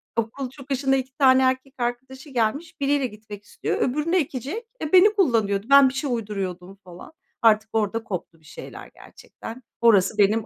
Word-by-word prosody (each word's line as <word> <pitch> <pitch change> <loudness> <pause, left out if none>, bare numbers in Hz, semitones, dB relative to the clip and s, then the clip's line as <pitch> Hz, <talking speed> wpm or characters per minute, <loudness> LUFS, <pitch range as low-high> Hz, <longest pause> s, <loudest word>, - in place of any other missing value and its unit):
okul 245 +4 -3
çıkışına 270 0 -1
2 260 0 -3
tane 260 -2 +5
erkek 260 +1 0
arkadaşı 260 +4 -5
gelmiş. 265 +7 -2
Biriyle 280 -1 +1
gitmek 210 -2 -12
istiyor, - - -4
öbürünü 300 +7 0
ekecek. 300 - -3
Eee, 310 +3 -4
beni 405 +4 +7
kullanıyordu. 220 - +1
Ben 275 -1 +7
bir - - -8
şey 270 +1 -3
uyduruyordum 195 -4 -5
falan. 180 - -13 0.3
Artık 215 -1 +3
orada 225 +1 -1
koptu 170 -5 -7
bir 155 - -26
şeyler - - -11
gerçekten. 235 +3 -12 0.2
Orası 210 -3 +4
benim 210 +2 +3
250 Hz, 160 wpm, -23 LUFS, 215-275 Hz, 0.3 s, beni